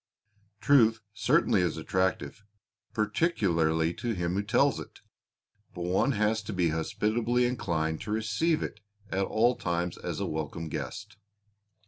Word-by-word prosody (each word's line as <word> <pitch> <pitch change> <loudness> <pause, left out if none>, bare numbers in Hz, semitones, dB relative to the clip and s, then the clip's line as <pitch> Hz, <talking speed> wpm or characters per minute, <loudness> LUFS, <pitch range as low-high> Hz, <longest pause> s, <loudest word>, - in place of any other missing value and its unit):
Truth 115 -5 +4
certainly 110 - +3
is 85 -2 0
attractive, 95 +5 -1 0.5
particularly 95 - +1
to 120 +5 -3
him 85 -1 -1
who 100 - +1
tells 100 - +2
it, - - -11 0.7
but 90 - -4
one 95 +10 +2
has 110 +1 +1
to 105 +1 -6
be 90 -3 +2
hospitably 110 +9 0
inclined 80 -10 -1
to 105 - -5
receive 110 +10 +1
it 105 - -6 0.3
at 95 +1 +1
all 120 +5 +2
times 85 0 -2
as - - -4
a - - -1
welcome 80 +1 -4
guest. 105 +6 -6
100 Hz, 135 wpm, -29 LUFS, 85-110 Hz, 0.7 s, Truth